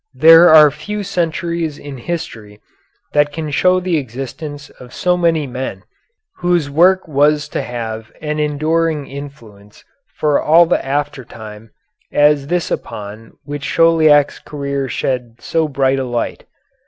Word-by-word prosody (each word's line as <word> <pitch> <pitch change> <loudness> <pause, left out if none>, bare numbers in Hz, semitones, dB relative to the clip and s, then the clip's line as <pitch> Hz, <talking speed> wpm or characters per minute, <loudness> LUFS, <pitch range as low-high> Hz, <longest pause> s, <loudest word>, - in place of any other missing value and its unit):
There 165 +2 +8
are 155 -2 +8
few 210 +7 -6
centuries 170 -3 -2
in 140 -3 -9
history 115 -9 -6 0.5
that 145 0 +2
can 155 0 -5
show 180 +5 +3
the 180 -2 -1
existence 145 +3 -7
of 125 -1 -12
so 180 0 +1
many 165 -3 +1
men 125 -7 -6 0.5
whose 175 -5 0
work 185 +5 +3
was 150 0 +2
to - - -3
have 110 -2 -6
an 150 0 -3
enduring 155 +1 0
influence 115 -8 -12 0.3
for 150 -2 +1
all 165 +3 +5
the - - 0
after 145 0 -3
time 110 -2 -11 0.4
as 145 -1 +3
this 175 +1 -1
upon 105 +2 -6
which 145 -1 -6
Chauliac's 155 -3 +4
career 140 -2 -4
shed 125 -2 -3
so 160 +3 -1
bright 135 -1 0
a - - -1
light. 120 -2 -4
145 Hz, 140 wpm, -17 LUFS, 130-165 Hz, 0.5 s, There